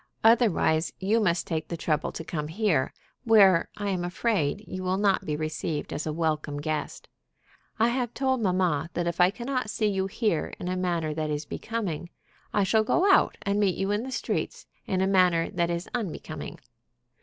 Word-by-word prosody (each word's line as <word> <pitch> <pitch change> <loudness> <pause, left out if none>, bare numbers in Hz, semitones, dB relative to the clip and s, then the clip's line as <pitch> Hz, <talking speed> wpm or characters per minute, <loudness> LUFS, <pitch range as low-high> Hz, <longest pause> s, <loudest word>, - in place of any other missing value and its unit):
Otherwise, 210 -8 +4
you 205 +4 +2
must 180 -5 +1
take 160 -2 -3
the 170 - -4
trouble 155 -1 -1
to - - -6
come 150 -2 -4
here, 170 -5 +1 0.3
where, 200 -7 +5
I 205 -1 -2
am 185 -2 -1
afraid, 195 0 -1
you 185 - -5
will 185 +1 0
not 200 -1 +2
be 150 - -1
received 155 0 -3
as 150 - -3
a - - 0
welcome 155 -2 -1
guest. 155 +1 -4 0.7
I 225 +1 +3
have 245 -1 -1
told 260 -2 +1
mamma 180 -6 +1
that 175 - 0
if 170 +1 0
I 180 - +7
cannot 250 +2 -3
see 215 - -1
you 195 -2 +1
here 210 -5 -1
in 180 - -5
a 185 - -1
manner 170 -4 -1
that 155 0 -2
is 150 0 -2
becoming, 195 -8 -4 0.4
I 205 - +2
shall 215 +3 +3
go 370 - +3
out - - +3
and 200 +1 0
meet 195 -3 +2
you 195 +1 0
in 205 +1 +1
the 260 +2 -6
streets, - - -3 0.2
in 185 -1 0
a 190 - +2
manner 180 -3 +3
that 170 -3 0
is 170 0 -3
unbecoming. 175 -7 -5
185 Hz, 190 wpm, -27 LUFS, 160-215 Hz, 0.7 s, I